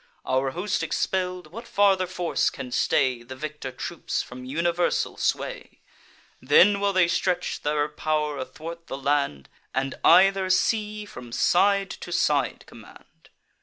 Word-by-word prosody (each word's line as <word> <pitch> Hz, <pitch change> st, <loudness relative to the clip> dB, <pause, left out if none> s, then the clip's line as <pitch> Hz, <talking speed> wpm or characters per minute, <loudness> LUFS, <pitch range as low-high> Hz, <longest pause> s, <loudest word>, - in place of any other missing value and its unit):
Our 130 Hz, +1 st, +1 dB
host 180 Hz, +8 st, -2 dB
expell'd, 180 Hz, -1 st, -2 dB
what 230 Hz, +5 st, -9 dB
farther 195 Hz, -2 st, +3 dB
force 175 Hz, -1 st, 0 dB
can 125 Hz, -, -8 dB
stay 125 Hz, 0 st, +1 dB
The 125 Hz, +2 st, -9 dB
victor 150 Hz, -1 st, -6 dB
troops 125 Hz, -, -4 dB
from 125 Hz, +1 st, -10 dB
universal 170 Hz, +5 st, 0 dB
sway? -, -, -3 dB, 0.6 s
Then 185 Hz, +10 st, +5 dB
will 200 Hz, 0 st, +1 dB
they 185 Hz, -3 st, +3 dB
stretch 180 Hz, +1 st, -1 dB
their 150 Hz, 0 st, 0 dB
pow'r 150 Hz, -1 st, -2 dB
athwart 165 Hz, +6 st, -8 dB
the 135 Hz, -, -5 dB
land, 140 Hz, -, -1 dB, 0.3 s
And 135 Hz, 0 st, -1 dB
either 195 Hz, 0 st, +5 dB
sea 210 Hz, +2 st, +1 dB
from 125 Hz, -11 st, -11 dB
side 195 Hz, +8 st, +2 dB
to 175 Hz, -, -8 dB
side 145 Hz, -6 st, +1 dB
command. -, -, -17 dB
170 Hz, 135 wpm, -25 LUFS, 135-190 Hz, 0.6 s, Then